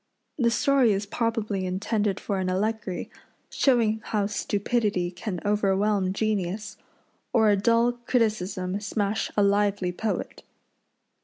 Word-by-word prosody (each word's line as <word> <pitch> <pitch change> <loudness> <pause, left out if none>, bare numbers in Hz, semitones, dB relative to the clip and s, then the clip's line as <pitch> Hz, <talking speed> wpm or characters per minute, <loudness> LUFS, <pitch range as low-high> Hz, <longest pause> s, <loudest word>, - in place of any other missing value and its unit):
The 235 -2 +4
story 255 -1 +3
is 200 +1 -2
probably 215 -3 -1
intended 200 +1 -1
for 200 -2 -2
an 185 -1 -1
allegory, 210 0 -2 0.4
showing 225 -5 +2
how 210 -2 0
stupidity 205 -2 -1
can 180 +1 -5
overwhelm 200 -1 +1
genius, 200 -1 -2 0.6
or 220 -3 +5
a - - +4
dull 230 +4 +3 0.2
criticism 200 -5 0
smash 205 0 -1
a 205 - +5
lively 200 -2 +2
poet. 215 +4 -3
205 Hz, 115 wpm, -26 LUFS, 195-220 Hz, 0.6 s, or